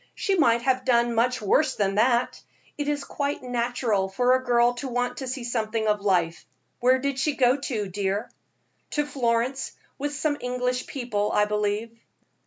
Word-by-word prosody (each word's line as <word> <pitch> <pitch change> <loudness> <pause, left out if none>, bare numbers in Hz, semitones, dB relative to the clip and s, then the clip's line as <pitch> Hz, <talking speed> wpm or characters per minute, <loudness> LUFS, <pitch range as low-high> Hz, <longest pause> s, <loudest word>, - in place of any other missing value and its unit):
"She 395 - 0
might 235 -8 +3
have 255 0 +1
done 235 -1 +2
much 245 +1 +1
worse 300 +9 +2
than 195 -2 0
that. 235 +4 +2 0.3
It 290 -1 -3
is 295 -1 -1
quite 285 -1 -3
natural 235 -5 0
for 245 +6 +2
a 260 0 +1
girl 240 -1 +3
to 275 - -4
want 245 0 -2
to 265 - -5
see 255 0 -4
something 225 -2 -1
of 210 -1 +1
life. 175 -4 +1 0.4
Where 255 +1 +4
did 275 0 -2
she 290 +1 +1
go 250 -1 +4
to, 245 -7 -3
dear?" 200 +4 -2 0.7
"To 295 - +2
Florence, 250 -1 -1 0.3
with 290 +1 -2
some 290 0 0
English 250 0 -2
people, 225 -6 -2
I 210 - +3
believe." 210 +2 -2
245 Hz, 175 wpm, -25 LUFS, 215-260 Hz, 0.7 s, Where